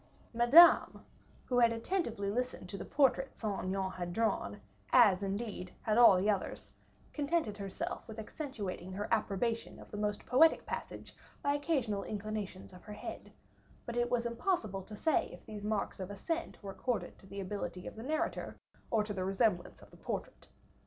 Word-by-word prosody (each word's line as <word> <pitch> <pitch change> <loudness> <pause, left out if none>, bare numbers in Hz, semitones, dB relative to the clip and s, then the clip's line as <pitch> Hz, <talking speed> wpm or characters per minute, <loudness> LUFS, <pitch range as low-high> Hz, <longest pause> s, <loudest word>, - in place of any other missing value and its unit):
Madame, 245 +9 +7 0.4
who 245 -1 +2
had 235 -1 +6
attentively 230 - -1
listened 250 -4 -3
to 190 - -6
the - - -5
portrait 270 -1 +2
Saint 205 -4 -3
Aignan 190 0 -1
had 175 -1 -5
drawn, 200 - 0 0.3
as, 205 -6 +6
indeed, 200 -1 -3
had 215 -2 +1
all 235 -5 +8
the 190 +3 +1
others, 200 -3 -1 0.4
contented 295 -7 0
herself 195 +3 -4
with 220 -1 -9
accentuating 210 - -5
her 205 +2 -3
approbation 225 +1 0
of - - -13
the 210 - -5
most 210 0 -2
poetic 305 +7 +5
passage - - -6 0.3
by 285 - +2
occasional 270 -9 0
inclinations 210 -3 -5
of 180 - -12
her 210 - -8
head; 210 - -8 0.5
but 235 - -5
it 240 0 +1
was 240 -1 +1
impossible 235 - -1
to 210 +3 -10
say 310 +8 +2
if - - -12
these 210 -2 -8
marks 210 -2 -1
of 185 0 -5
assent 325 - -3
were 195 - -5
accorded 240 +3 -3
to 195 - -16
the 200 +1 -7
ability 185 -2 -4
of - - -7
the 220 - -8
narrator 310 +6 -2 0.3
of 210 -3 +1
the 185 - -2
resemblance 195 -1 0
of - - -17
the - - -16
portrait. - - -5
215 Hz, 175 wpm, -33 LUFS, 195-245 Hz, 0.5 s, all